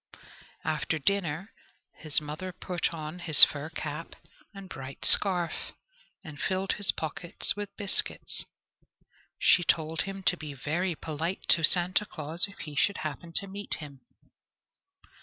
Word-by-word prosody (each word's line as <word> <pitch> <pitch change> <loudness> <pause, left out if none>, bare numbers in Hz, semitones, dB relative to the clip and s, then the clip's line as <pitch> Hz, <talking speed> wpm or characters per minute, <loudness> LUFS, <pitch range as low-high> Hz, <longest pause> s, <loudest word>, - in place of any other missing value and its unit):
After 155 0 -1
dinner 185 +3 -2 0.4
his 155 -2 0
mother 155 +5 -7
put 180 -1 -3
on 160 +1 -7
his 165 -4 +10
fur 150 +1 +4
cap 155 0 -7 0.4
and 195 -2 -11
bright 135 -6 -8
scarf, 180 -5 +4 0.5
and 150 -3 -10
filled 190 +1 -1
his 205 - +1
pockets 165 +2 -2
with 205 -1 -7
biscuits. 200 -3 0 0.9
She 175 - +4
told 160 -1 0
him 195 0 -6
to 180 - +2
be 150 -4 -9
very 165 +6 -2
polite 160 +4 -4
to 165 - +5
Santa 180 +5 +2
Claus 160 +4 +1
if 200 - -16
he 150 0 -8
should 200 +8 +1
happen 155 +3 -6
to 200 - +1
meet 200 +1 -6
him. 140 -4 -11
165 Hz, 140 wpm, -28 LUFS, 155-190 Hz, 0.9 s, his